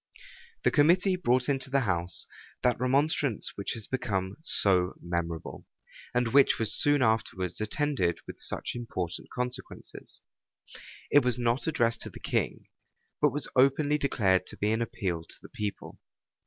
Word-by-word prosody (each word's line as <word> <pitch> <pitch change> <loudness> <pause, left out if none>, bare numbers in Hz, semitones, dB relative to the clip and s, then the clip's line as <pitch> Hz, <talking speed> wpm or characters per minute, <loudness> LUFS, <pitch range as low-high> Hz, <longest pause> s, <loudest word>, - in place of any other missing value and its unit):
The - - +3
committee 180 +5 +4
brought 130 -8 +1
into 135 -2 0
the 135 0 +2
house 90 -5 -1 0.4
that 125 -2 +2
remonstrance 135 -1 +1
which 100 - -3
has 110 -2 -5
become 100 -7 -2
so 95 - +4
memorable, 85 -2 -4 0.4
and 125 -1 +1
which 140 0 +5
was 115 - +1
soon 145 -2 +3
afterwards 110 -5 -1
attended 110 - 0
with - - -10
such - - -1
important 95 -8 -5
consequences. 125 +1 -6 0.9
It 145 - +6
was 125 -2 +1
not 120 +3 0
addressed 120 -7 +1
to - - -5
the - - -12
king; - - -2 0.6
but 150 - +5
was 145 0 -3
openly 145 +3 +3
declared 95 -10 +1
to - - -8
be 105 +1 0
an 110 +1 0
appeal 90 -7 -3
to - - -11
the - - -14
people. 105 -1 -6
120 Hz, 150 wpm, -29 LUFS, 95-140 Hz, 0.9 s, It